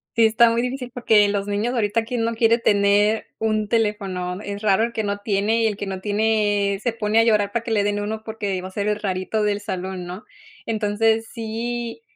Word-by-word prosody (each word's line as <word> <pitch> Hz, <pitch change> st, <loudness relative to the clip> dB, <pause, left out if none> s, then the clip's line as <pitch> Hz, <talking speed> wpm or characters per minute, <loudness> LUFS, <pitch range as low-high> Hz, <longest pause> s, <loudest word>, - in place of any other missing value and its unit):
Sí 230 Hz, -, +5 dB
está 230 Hz, +1 st, +4 dB
muy 230 Hz, -, +1 dB
difícil 250 Hz, 0 st, -4 dB
porque 220 Hz, -4 st, +4 dB
los 200 Hz, 0 st, -2 dB
niños, 210 Hz, +5 st, -1 dB
ahorita, 225 Hz, -1 st, +1 dB
¿quién 235 Hz, 0 st, -2 dB
no 230 Hz, 0 st, -1 dB
quiere 230 Hz, +1 st, +3 dB
tener 205 Hz, +1 st, +3 dB
un 215 Hz, -1 st, 0 dB
teléfono? 195 Hz, -5 st, -1 dB
Es 205 Hz, -1 st, -6 dB
raro 210 Hz, 0 st, +3 dB
el 235 Hz, 0 st, -2 dB
que 220 Hz, -, -2 dB
no 200 Hz, 0 st, -2 dB
tiene, 210 Hz, +2 st, +1 dB
y 225 Hz, -, +4 dB
el 210 Hz, -, -1 dB
que 205 Hz, -, -5 dB
no 190 Hz, -1 st, -5 dB
tiene 205 Hz, -1 st, +1 dB
se 240 Hz, -2 st, 0 dB
pone 215 Hz, -1 st, -1 dB
a 225 Hz, -, +6 dB
llorar 210 Hz, -3 st, +2 dB
para 235 Hz, 0 st, -2 dB
que 230 Hz, -, -5 dB
le 210 Hz, -2 st, +2 dB
den 205 Hz, 0 st, 0 dB
uno 215 Hz, +1 st, -3 dB
porque 205 Hz, -4 st, -3 dB
va 185 Hz, -, -6 dB
a -, -, -16 dB
ser 205 Hz, +1 st, -2 dB
el 210 Hz, 0 st, 0 dB
rarito 190 Hz, +2 st, -1 dB
del 205 Hz, -1 st, 0 dB
salón, 185 Hz, -2 st, -5 dB
¿no? 180 Hz, +4 st, -8 dB, 0.4 s
Entonces, 220 Hz, +1 st, +1 dB
sí, 235 Hz, -, -4 dB
210 Hz, 220 wpm, -22 LUFS, 205-225 Hz, 0.4 s, a